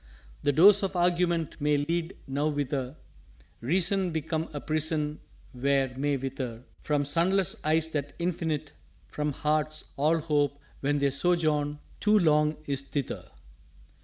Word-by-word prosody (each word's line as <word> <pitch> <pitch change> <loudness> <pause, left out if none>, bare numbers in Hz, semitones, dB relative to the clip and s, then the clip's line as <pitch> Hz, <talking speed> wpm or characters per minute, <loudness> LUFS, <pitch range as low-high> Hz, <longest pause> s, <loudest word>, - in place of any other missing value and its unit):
_" - - -32 0.4
"The 145 - +2
doors 195 +8 +7
of 195 -1 -2
Argument 175 -2 +1
may 150 0 +3
lead 165 +4 -2
Nowhither, 140 -1 -1 0.6
Reason 180 +7 +1
become 160 0 -2
a 145 - -4
Prison 155 0 -1 0.3
where 135 0 +1
may 140 +1 0
wither 130 -3 -5 0.2
From 145 -1 0
sunless 170 +5 +1
eyes 160 +1 +2
the 145 -2 -3
Infinite, 160 -4 -2 0.3
from 150 0 -2
hearts 155 +1 -1
All 155 +4 +3
Hope, 145 -3 0 0.2
when 145 +1 +1
their 140 -1 +2
sojourn 150 -2 +1 0.2
too 210 +1 +4
long 150 -4 +3
is 140 -2 -1
thither." 140 -1 -4
150 Hz, 135 wpm, -28 LUFS, 145-165 Hz, 0.6 s, doors